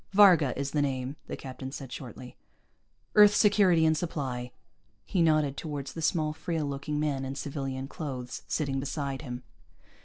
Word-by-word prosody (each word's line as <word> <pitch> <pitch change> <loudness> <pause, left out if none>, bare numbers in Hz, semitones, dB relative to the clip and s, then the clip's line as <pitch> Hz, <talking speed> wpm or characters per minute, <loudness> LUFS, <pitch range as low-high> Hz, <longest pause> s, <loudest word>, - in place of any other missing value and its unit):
"Varga 180 -9 +6
is 140 0 -2
the 150 - +1
name," 135 -1 -1
the - - -5
captain 130 0 -7
said 135 -2 -7
shortly. 125 0 -8 0.8
"Earth 210 0 +8
Security 200 -6 +5
and 160 0 +4
Supply." 130 -7 -3 0.5
He 180 - 0
nodded 155 -4 +3
toward 145 -1 -4
the 165 +4 -6
small, 155 -2 +1
frail 160 0 -2
looking 145 +1 -3
man 145 -3 0
in 135 +1 -4
civilian 135 -1 -4
clothes, 130 -5 -5
sitting 140 -3 -1
beside 140 -1 -3
him. 125 -4 -6
145 Hz, 155 wpm, -29 LUFS, 135-160 Hz, 0.8 s, Earth